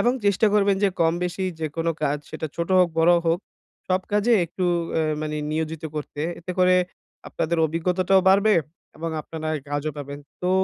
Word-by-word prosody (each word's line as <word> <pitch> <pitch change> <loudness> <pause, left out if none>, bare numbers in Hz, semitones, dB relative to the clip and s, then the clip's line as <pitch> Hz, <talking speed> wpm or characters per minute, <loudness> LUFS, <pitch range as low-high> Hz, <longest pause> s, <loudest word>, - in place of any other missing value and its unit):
এবং 245 - +3
চেষ্টা 200 +2 +3
করবেন 200 -1 +3
যে - - +5
কম-বেশি 175 +3 0 0.2
যেকোনো 165 +2 -1
কাজ 145 0 +1
সেটা 160 - -4
ছোট 170 0 -2
হোক, 180 -1 +5
বড় 170 +2 +6
হোক 165 +1 +3 0.5
সব 185 0 +2
কাজে 210 +3 +3
একটু 175 +2 -4 0.3
এ - - +2 0.2
মানে 150 0 -3 0.2
নিয়োজিত 160 0 -3
করতে। 150 -1 -5 0.2
এতে 180 +2 -5
করে 185 0 +5 0.5
আপনাদের 170 +1 -1
অভিজ্ঞতাটাও 180 +4 +2
বাড়বে 200 +3 +5 0.4
এবং 165 +1 -4
আপনারা 160 0 -6
এ 145 - -6
কাজও 145 +1 -2
পাবেন। 140 0 -6 0.2
তো 180 - +1
170 Hz, 170 wpm, -24 LUFS, 155-185 Hz, 0.5 s, বড়